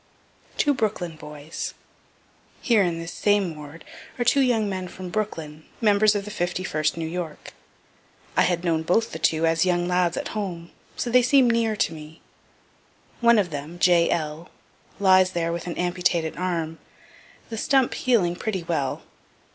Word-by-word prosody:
TWO 290 - +3
BROOKLYN 205 - -2
BOYS 150 0 -7 0.8
Here 230 -4 +3
in 175 -3 0
this 165 +1 -6
same 205 -5 +1
ward 150 +1 -11 0.3
are 240 - -1
two 275 - +4
young 235 -5 +2
men 185 -2 -3
from 185 0 -8
Brooklyn, 160 -8 -4 0.2
members 210 -1 +4
of 200 -1 -2
the 210 - -7
51st 175 -5 -1
New 165 - -3
York. 165 -2 -6 0.8
I - - +4
had 175 -1 +1
known 165 -2 +1
both 225 +8 +1
the 160 - -6
two 160 +1 +2
as 165 0 +2
young 175 -1 +1
lads 180 -1 +1
at - - -3
home, 180 -6 -5 0.2
so 240 - -3
they 250 +1 +6
seem 255 +1 +4
near 230 -2 +1
to 165 - 0
me. 155 0 -11 1.0
One 235 -1 +5
of 190 -5 +1
them, 150 +4 -6
J. 175 -1 +4
L., 155 0 -3 0.5
lies 185 -1 +5
there 170 -1 -1
with 170 +1 -4
an 175 - -4
amputated 175 -2 0
arm, 165 -3 -3 0.7
the 225 - -4
stump 265 -1 +2
healing 200 -9 +1
pretty 190 -2 -3
well. 155 -6 -2
180 Hz, 165 wpm, -24 LUFS, 165-210 Hz, 1.0 s, they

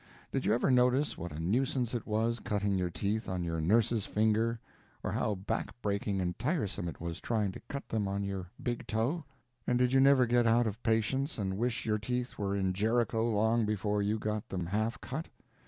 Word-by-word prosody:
Did - - -1
you - - +4
ever 125 - +2
notice 125 +3 +3
what 85 +1 -6
a 75 - -7
nuisance 120 +7 0
it 120 - -3
was 115 +2 +1
cutting 100 -1 0
your 90 -1 0
teeth 105 +5 -2
on 90 -1 -2
your 80 -1 -2
nurse's 110 +4 +2
finger, 110 +2 +2 0.4
or - - -1
how 105 - 0
back 110 +5 -3
breaking 100 -1 0
and 90 -1 -2
tiresome 105 - -1
it 85 - -6
was 85 +1 -5
trying 105 -4 0
to - - -9
cut 140 - -5
them 105 -3 -1
on 100 +1 -1
your 95 -2 -4
big 120 -1 -2
toe? 125 +10 0 0.4
And 125 - +3
did 125 +1 +2
you 135 - +6
never 135 -1 +6
get 120 0 +3
out 120 +1 +4
of 110 +1 -3
patience 125 +6 +1
and 95 -3 -1
wish 120 +3 -1
your 110 -1 +1
teeth 125 +3 -3
were 100 -1 0
in 95 -2 +1
Jerico 115 +3 +1
long 110 +2 +3
before 105 -1 0
you 105 +2 +1
got 105 -1 -3
them 90 -2 -2
half 110 +6 -1
cut? - - -4
110 Hz, 205 wpm, -32 LUFS, 100-120 Hz, 0.4 s, you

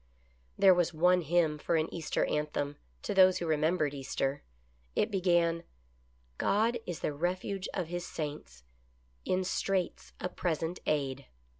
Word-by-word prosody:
There 190 -1 +7
was 175 -2 +1
one 180 +3 +4
hymn 160 -1 +1
for 170 - 0
an 160 0 +2
Easter 165 -3 -1
anthem, 145 -1 -2 0.3
to - - -2
those 185 -1 +6
who 175 - -3
remembered 155 -1 +1
Easter. 135 0 -2 0.5
It 215 - +1
began: 175 -3 +2 0.4
" - - -37 0.3
God 230 +4 +2
is 175 -2 -4
the 150 - -1
refuge 185 +5 -2
of 180 -4 -2
His 175 0 -3
saints, 105 - -6 0.6
In 185 0 +1
straits 185 0 -2
a - - -2
present 170 -1 -2
aid." 140 -2 -1
170 Hz, 145 wpm, -31 LUFS, 150-180 Hz, 0.6 s, There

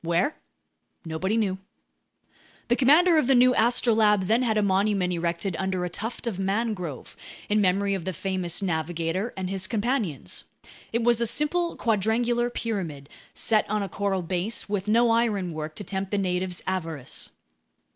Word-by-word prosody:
Where? 170 - +1 0.7
Nobody 185 +7 -1
knew. 190 -4 0 1.1
The 240 - +4
commander 310 +6 +5
of 255 - 0
the 270 - +5
new 250 +1 +6
Astrolabe 225 -4 +3
then 225 +6 +3
had 225 -4 +1
a 210 - +3
monument 195 -1 +1
erected 170 +2 -2
under 190 -1 -1
a 175 - -5
tuft 225 +7 -5
of 215 -6 -3
mangrove, 195 - -2 0.3
in 210 0 +3
memory 200 +1 +2
of 190 -3 -3
the 190 - -2
famous 185 0 -2
navigator 170 +4 -1
and 190 -1 -3
his 190 0 -1
companions. 205 - -1 0.5
It 230 +1 0
was 235 0 +3
a 235 - +2
simple 335 +8 0
quadrangular 235 +2 +1
pyramid, 175 -13 -4 0.3
set 215 -2 +2
on 210 -1 0
a 195 - -5
coral 195 -1 -1
base, 185 +6 -2
with 205 -1 -2
no 230 +2 +4
ironwork 185 -9 -1
to - - -6
tempt 190 0 -3
the 205 - -1
natives' 185 -1 -2
avarice. 165 -8 -3
200 Hz, 155 wpm, -26 LUFS, 180-230 Hz, 1.1 s, new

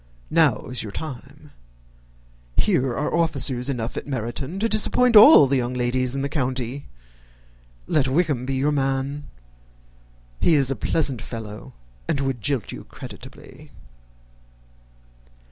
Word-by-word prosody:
Now 155 -8 +2
is 125 -1 -4
your 105 - -7
time. 135 +1 -9 1.1
Here 130 - +2
are 130 +4 -2
officers 145 -6 +1
enough 120 -3 -3
at - - -6
Meryton 130 - -4
to 220 +3 +1
disappoint 230 +2 +2
all 210 - +9
the 135 0 +1
young 125 0 -2
ladies 125 +1 -1
in 135 - -2
the - - 0
country. 130 -2 -3 1.0
Let 140 - +1
Wickham 140 -3 0
be 135 - -1
your 140 +3 +1
man. 135 +1 -2 1.1
He 165 - +3
is 135 -2 +2
a - - -1
pleasant 135 -6 -1
fellow, 110 -3 -8 0.3
and 140 - 0
would 135 -3 -2
jilt 135 -3 -2
you - - -9
creditably." - - -12
135 Hz, 130 wpm, -23 LUFS, 125-150 Hz, 1.1 s, all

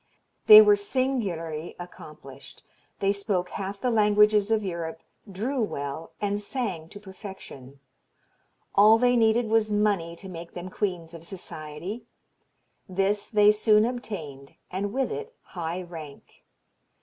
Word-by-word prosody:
They 430 0 +12
were 415 -1 +6
singularly 210 - -2
accomplished; 150 -6 -12 0.4
they 200 0 +2
spoke 200 -3 -2
half 200 +1 -5
the 250 - 0
languages 210 -1 +4
of 220 -2 +1
Europe, 165 -3 -5 0.3
drew 240 +8 -2
well, 155 -4 -4
and 205 0 -1
sang 200 -8 -4
to 205 - -11
perfection. 190 - -11 0.9
All 215 +2 +7
they 245 +1 +3
needed 225 0 +3
was 220 -1 +2
money 205 -5 +1
to 190 - -11
make 170 -2 -9
them 175 +1 -6
queens 175 -6 -3
of 165 -1 -10
society; 180 +4 -7 0.8
this 195 +2 0
they 210 -1 +5
soon 215 0 +4
obtained, 185 - -6 0.2
and 195 +2 -3
with 265 - -1
it 450 +2 -6
high 175 +1 -5
rank. 160 -5 -12
200 Hz, 130 wpm, -26 LUFS, 170-220 Hz, 0.9 s, They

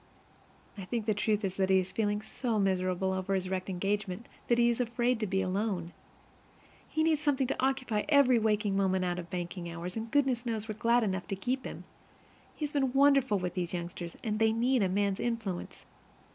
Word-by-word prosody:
I 190 - -6
think 230 +2 -2
the 215 - +2
truth 210 0 0
is 190 -1 -3
that 190 -1 +1
he 190 - +5
is 185 0 0
feeling 210 -1 0
so 230 0 -2
miserable 190 -1 +1
over 190 +1 -1
his 185 -1 -2
wrecked 185 0 -3
engagement 195 +3 -2 0.2
that 235 - +3
he 235 0 +5
is 235 0 +1
afraid 240 0 0
to 215 - -1
be 190 0 0
alone. 185 -2 -2 1.0
He 315 - +1
needs 315 -2 +2
something 285 -3 +2
to 255 - -2
occupy 260 -5 0
every 275 -5 +5
waking 210 -2 +1
moment 190 -1 +2
out 175 0 -1
of 170 -1 -8
banking 175 0 -4
hours. 170 +2 -6
And 225 0 -4
goodness 265 -3 +2
knows 225 -3 -3
we're 215 - -3
glad 235 +2 +2
enough 190 -3 -2
to 195 - -2
keep 255 +7 -2
him! - - -7 0.7
He 305 - -2
has 295 - -5
been 270 -4 +1
wonderful 275 -5 +4
with 180 -1 -3
those 180 -1 -2
youngsters, 170 0 -6
and 215 -2 -1
they 220 0 +4
need 245 +2 +2
a 190 - +2
man's 200 0 0
influence. 225 -7 -3
210 Hz, 205 wpm, -30 LUFS, 190-240 Hz, 1.0 s, he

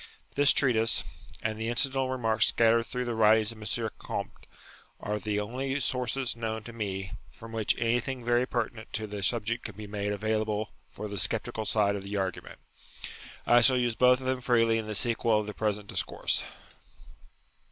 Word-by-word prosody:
This 145 0 +5
treatise, 115 -5 +2 0.4
and 110 0 -2
the 110 - -1
incidental 130 +2 +1
remarks 115 -4 +2
scattered 115 0 +3
through 125 -1 -3
the 120 - -2
writings 110 0 +4
of 115 - -11 0.2
M. 110 - -1
Comte, - - -6 0.5
are 105 +1 -3
the 105 0 -1
only 130 +6 -2
sources 125 -1 -1
known 110 -1 -3
to 115 - -9
me 95 -4 -4 0.2
from 115 0 -12
which 110 -2 +1
anything 120 +2 -1
very 120 +1 +2
pertinent 115 -2 -3
to 110 - -2
the 105 -1 -6
subject 115 +3 0
can 110 - -7
be 105 +1 -8
made 105 0 -3
available 110 0 -1 0.2
for 105 - -7
the 100 -1 -4
sceptical 110 0 +1
side 100 -1 +2
of 100 - -4
the 100 +1 -4
argument. 95 -2 -4 0.9
I 120 0 +6
shall 130 +2 +5
use 120 -2 +1
both 125 +3 +5
of 130 - -8
them 130 0 -1
freely 115 -2 +3
in 110 - -5
the 105 - -3
sequel 115 0 +2
of 105 - -3
the 105 - -6
present 105 -1 -1
discourse. - - 0
115 Hz, 180 wpm, -29 LUFS, 105-120 Hz, 0.9 s, I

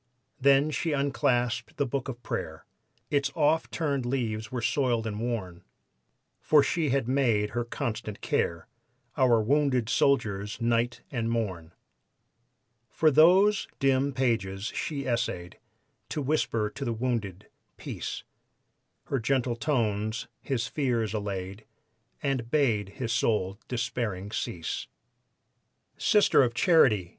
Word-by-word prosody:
Then 140 +3 +4
she 155 +3 -1
unclasped 135 -4 0
the 140 - +1
book 135 +1 -3
of 120 -1 -7
prayer, 80 +4 -5 0.5
Its 140 -1 +1
oft 155 +1 +2
turned 145 -5 -1
leaves 115 -4 -2
were 125 - -2
soiled 120 -5 +1
and 105 -1 -3
worn, 105 -7 -4 0.8
For 150 -2 +4
she 160 -4 0
had 135 -2 +1
made 120 -6 +2
her 120 +1 -1
constant 115 -4 -4
care 85 -1 -1 0.5
Our 125 -3 +4
wounded 130 -2 +2
soldiers 105 -7 +1
night 115 0 0
and 115 -4 -1
morn. 95 -8 -3 1.2
From 155 +4 +3
those 190 +7 +5
dim 135 +1 +2
pages 115 -6 -1
she 140 -3 -3
essayed 115 -8 -2 0.5
To - - -3
whisper 115 -7 0
to 140 - -6
the 120 -3 -1
wounded, 110 -6 -3 0.3
"Peace!" - - -5 0.8
Her 135 - -2
gentle 125 0 0
tones 110 -5 -1
his 125 -4 -1
fears 120 -7 -1
allayed 100 -1 -4 0.6
And 130 -5 -1
bade 115 -9 +1
his 115 -3 -2
soul 105 -4 0
despairing 115 -5 -3
cease. 85 -6 -4 1.1
"Sister 210 -7 +4
of 120 -3 +1
Charity!" 120 - +4
120 Hz, 120 wpm, -28 LUFS, 110-140 Hz, 1.2 s, those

